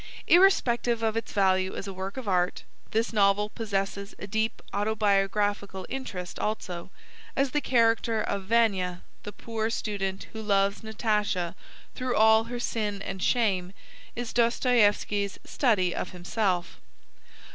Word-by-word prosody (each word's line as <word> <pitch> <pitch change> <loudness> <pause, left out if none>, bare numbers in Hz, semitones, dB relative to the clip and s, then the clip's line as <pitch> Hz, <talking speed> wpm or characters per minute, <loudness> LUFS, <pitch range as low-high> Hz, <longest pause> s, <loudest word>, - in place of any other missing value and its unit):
Irrespective 245 - +4
of 220 -1 +1
its 225 - -3
value 190 -2 +2
as 195 - -5
a 195 - -5
work 190 +4 -6
of 260 -4 -6
art, 180 -1 +1 0.3
this 225 +2 0
novel 205 0 +3
possesses 200 -2 -3
a - - -7
deep 220 +2 -1
autobiographical 205 -2 0
interest 195 -10 -5
also, 185 -5 -3 0.5
as 275 -1 +1
the 295 - +1
character 230 -3 +2
of 200 -2 -2
Vania, 195 -5 +1 0.2
the 205 - -7
poor 225 0 -3
student 195 -4 -3
who 220 - -5
loves 200 -1 +1
Natasha 210 -5 -1 0.4
through 255 -1 -2
all 220 +1 +5
her 240 +1 -5
sin 210 -4 -2
and 190 - -5
shame, 190 -6 +1 0.4
is 240 -1 -4
Dostoieffski's 225 -4 +2
study 195 - +1
of 180 - -4
himself. 180 0 -1
210 Hz, 135 wpm, -27 LUFS, 195-230 Hz, 0.5 s, all